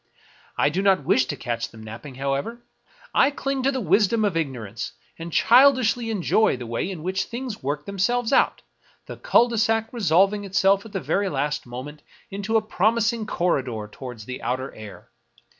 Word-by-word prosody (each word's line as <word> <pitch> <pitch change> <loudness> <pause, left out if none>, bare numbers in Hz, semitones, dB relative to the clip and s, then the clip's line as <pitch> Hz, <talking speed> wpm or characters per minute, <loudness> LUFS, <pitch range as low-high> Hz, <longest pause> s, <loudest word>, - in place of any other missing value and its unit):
I 145 - +3
do 180 +6 -1
not 190 -7 +2
wish 130 - +3
to - - -4
catch 120 -1 -3
them 110 -1 -13
napping, 115 +5 -9
however; 140 - -3 0.5
I 275 - +5
cling 275 -1 -3
to 270 +2 +2
the 265 - -2
wisdom 210 +3 +2
of 200 -5 0
ignorance, 120 -9 -4 0.3
and 165 +1 -6
childishly 245 - +4
enjoy 215 -4 +2
the 125 - -7
way 115 +10 -3
in 175 -5 -7
which 190 +2 -1
things 240 -2 -6
work 145 +2 -3
themselves 225 +6 0
out - - +2 0.2
— - - -34
the - - -8
cul 365 - +4
de 235 -2 -2
sac 225 0 +1
resolving 200 -1 +2
itself 195 +1 +2
at - - -15
the 190 - -1
very 200 0 0
last 145 -2 -2
moment 135 +5 -8 0.3
into 205 +3 0
a 220 - 0
promising 220 +2 +1
corridor 130 - -1
toward 125 -1 -8
the 125 +4 -7
outer 130 +3 -3
air. 110 +1 -12
190 Hz, 180 wpm, -24 LUFS, 135-225 Hz, 0.5 s, I